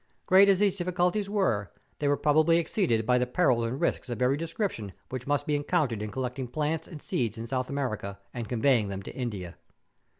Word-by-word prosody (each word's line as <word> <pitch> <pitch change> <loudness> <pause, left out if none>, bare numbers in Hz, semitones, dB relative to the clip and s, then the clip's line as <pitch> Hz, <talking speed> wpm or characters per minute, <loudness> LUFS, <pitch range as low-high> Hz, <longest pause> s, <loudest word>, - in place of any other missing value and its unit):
Grreat 190 +2 +7
as 195 - +5
these 200 -1 +2
diffi¬ 180 -1 -2
culties 180 +3 +1
were, 115 - 0 0.3
they 145 - 0
were 145 0 +3
probably 155 +3 +4
exceeded 155 - +1
by 125 +1 +3
the 125 - 0
perils 125 -4 +2
and 125 +4 -3
risks - - -1
of 120 -3 -4
every 125 +2 +3
description 165 - -3 0.2
which 130 0 -6
must 145 0 +1
be 150 - +1
encountered 145 - 0
in 105 - -3
collecting 125 +2 -3
plants 150 +5 -2
and 160 - -9
seeds 115 -2 -1
in 115 - -5
South 130 +1 -2
America, 110 -8 -3 0.2
and 120 -3 -5
conveying 120 -2 +2
them 100 0 -5
to - - -8
India. 100 -9 -5
130 Hz, 205 wpm, -28 LUFS, 115-165 Hz, 0.3 s, Grreat